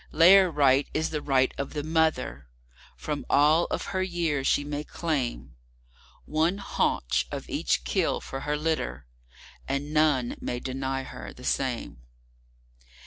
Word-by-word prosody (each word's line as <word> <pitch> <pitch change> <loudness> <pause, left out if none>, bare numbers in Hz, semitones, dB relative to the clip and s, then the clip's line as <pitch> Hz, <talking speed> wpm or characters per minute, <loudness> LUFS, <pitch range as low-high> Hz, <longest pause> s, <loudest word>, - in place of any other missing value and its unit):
Lair 185 +4 +7
Right 140 -3 +3
is 160 +1 0
the 150 -1 -2
right 130 -2 +2
of 140 - -4
the 150 -1 -3
Mother. 160 - 0 0.5
From 150 -2 -4
all 155 +4 +4
of - - -3
her 185 - 0
year 170 -6 -1
she 145 - +2
may 145 0 -4
claimOne 130 - -3 1.1
haunch 65 - 0
of - - -5
each - - 0
kill - - 0
for 135 - -6
her 150 +2 -2
litter; 145 - -2 0.6
and 140 +2 -3
none 150 -6 +2
may 120 - -3
deny 135 +1 -3
her - - -9
the 125 - -14
same. 125 - -2
145 Hz, 140 wpm, -27 LUFS, 130-160 Hz, 1.1 s, Lair